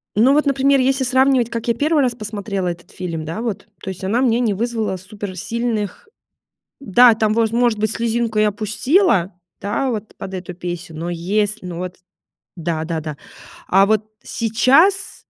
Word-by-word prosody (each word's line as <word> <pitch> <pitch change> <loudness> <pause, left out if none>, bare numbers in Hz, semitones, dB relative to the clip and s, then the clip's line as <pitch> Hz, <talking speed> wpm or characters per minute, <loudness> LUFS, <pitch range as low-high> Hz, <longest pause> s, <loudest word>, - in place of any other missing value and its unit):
Но 240 +6 +5
вот, 300 +1 +3
например, 275 0 +3
если 265 +1 +2
сравнивать, 260 -1 +3
как 230 0 -5
я 235 - +3
1 295 +4 +2
раз 245 -2 0
посмотрела 205 -4 -4
этот 175 0 -6
фильм, 170 -4 -5
да, 165 +8 -5
вот. 230 -4 -4
То - - -6
есть 190 0 -7
она 215 +6 +1
мне 240 -3 +2
не 230 -4 +1
вызвала 220 -2 -2
суперсильных 205 - -4 0.7
Да, 240 0 +6
там 215 -1 +1
воз 225 0 +1
может 235 -2 +2
быть, 215 0 0
слезинку 230 -1 -1
я 215 0 +4
пустила, 215 - +1 0.3
да, 210 +6 -1
вот 220 -2 -5
под 190 - -7
эту 180 -1 -6
песню, 175 -2 -6
но 170 +2 -4
есл 205 +5 0
но 180 -2 -6
вот 180 0 -5 0.6
Да-да-да. 160 -2 -3 0.5
А 195 +1 +5
вот 215 0 +1 0.2
сейчас 275 - +2
215 Hz, 165 wpm, -20 LUFS, 185-245 Hz, 0.7 s, Да